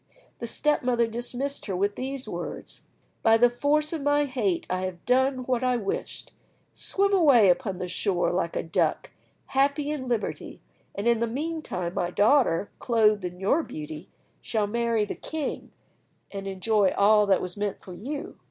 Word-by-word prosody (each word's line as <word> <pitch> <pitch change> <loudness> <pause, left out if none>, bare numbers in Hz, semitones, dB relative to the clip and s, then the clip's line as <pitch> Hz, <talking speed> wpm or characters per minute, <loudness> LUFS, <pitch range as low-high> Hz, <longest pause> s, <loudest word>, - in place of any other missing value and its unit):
The 235 - -4
step 300 +5 +1
mother 240 -2 +2
dismissed 245 +5 -3
her 190 - -2
with 200 +3 0
these 265 +1 -4
words: - - -6 0.4
"By 225 -1 +5
the 240 +1 +5
force 300 +5 +1
of 320 - -3
my 290 +1 +2
hate, 225 -10 -1
I 185 0 -2
have 180 -2 -7
done 260 +1 +2
what 250 0 -1
I 250 -1 +2
wished! 200 -4 -5 0.4
Swim 400 +1 +1
away 280 - +6
upon 195 -1 -2
the 180 0 -4
shore 180 0 0
like 175 -2 -1
a - - -1
duck, 165 - 0 0.4
happy 280 +2 +2
in 275 -4 -4
liberty, 235 -4 -3 0.4
and 200 +3 -2
in 235 -1 +3
the 235 - 0
meantime 275 - -3
my 175 - -1
daughter, 205 - +3
clothed 215 -4 +2
in 180 0 -5
your 205 - +2
beauty, 155 - -8 0.3
shall 215 -3 -1
marry 230 0 0
the - - -4
king, 315 -3 -5 0.6
and 195 -1 -6
enjoy 195 +1 +1
all 210 +1 +5
that 190 -2 +4
was 180 -1 -4
meant 205 -1 -3
for 185 - -11
you." 290 - -6
230 Hz, 170 wpm, -26 LUFS, 195-275 Hz, 0.6 s, away